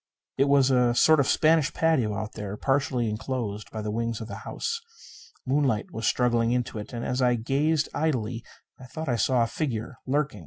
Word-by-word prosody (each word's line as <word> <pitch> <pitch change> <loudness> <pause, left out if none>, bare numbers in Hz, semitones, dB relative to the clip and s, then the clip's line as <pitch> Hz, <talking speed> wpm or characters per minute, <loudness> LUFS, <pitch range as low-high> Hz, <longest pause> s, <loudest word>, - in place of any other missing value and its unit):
It 135 - +3
was 140 -1 +4
a 125 -2 +3
sort 155 +5 +5
of 140 - +2
Spanish 155 -2 +3
patio 130 -11 +1
out 105 +1 -4
there, 105 -1 -6
partially 135 -3 0
enclosed 105 -1 -4
by 110 -1 -6
the 105 - -3
wings 115 0 -2
of 110 - -6
the - - -7
house. 465 0 -3 0.6
Moonlight 130 -5 0
was 115 - -2
struggling 120 -2 +2
into 125 -3 -2
it. 105 - -8
And, 120 -1 -5
as 125 +1 -1
I 125 -1 +3
gazed 140 +6 +1
idly, 125 -7 -1 0.4
I 130 - -11
thought 160 +5 -6
I 120 - +1
saw 120 +2 +2
a - - +2
figure 120 -2 -4
lurking. 140 -4 0
125 Hz, 195 wpm, -26 LUFS, 115-140 Hz, 0.6 s, sort